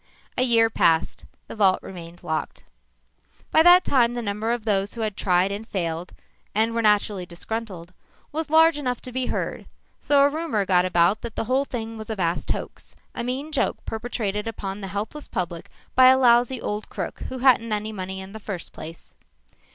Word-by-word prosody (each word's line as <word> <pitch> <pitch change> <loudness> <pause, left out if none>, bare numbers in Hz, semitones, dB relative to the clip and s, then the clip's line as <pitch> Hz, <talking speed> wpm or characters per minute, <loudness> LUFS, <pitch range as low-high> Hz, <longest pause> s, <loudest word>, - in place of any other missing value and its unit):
A - - 0
year 230 -3 +4
passed. 165 -6 +1 0.2
The - - -8
vault 195 -3 +4
remained 175 -2 -10
locked. 160 -2 -3 0.9
By 315 - +6
that 355 +2 +7
time 240 -3 +2
the 240 - -3
number 210 +2 -2
of 235 -2 -2
those 200 -1 0
who 230 - -5
had 215 -3 -2
tried 185 0 +2
and 210 +3 -5
failed, 170 -4 -3 0.4
and 225 +2 +2
were 230 - 0
naturally 210 -3 +2
disgruntled, 180 -1 -6 0.4
was 315 +1 -3
large 320 0 +5
enough 250 -4 -2
to 255 - -9
be 255 0 -2
heard, - - -3 0.3
so 285 -1 +4
a 285 - +5
rumor 295 -9 -1
got 180 -1 +3
about 175 +2 +2
that 235 -2 -7
the - - -1
whole 260 +4 +1
thing 225 -3 -5
was 220 - -8
a 220 - -2
vast 175 -3 -1
hoax - - -5 0.2
a 235 - -4
mean 265 +5 -3
joke 295 - -1
perpetrated 220 -2 -3
upon 200 -2 -5
the 195 - -5
helpless 210 +10 -5
public 175 -2 -4 0.2
by 255 0 +7
a 260 0 +7
lousy 245 0 +4
old 210 -1 -4
crook - - -5
who 260 - -5
hadn't 245 -3 +4
any 210 +1 -2
money 190 -2 -5
in 190 0 -9
the 220 - -8
first 200 -5 -7
place. 165 +1 -10
220 Hz, 190 wpm, -24 LUFS, 190-250 Hz, 0.9 s, that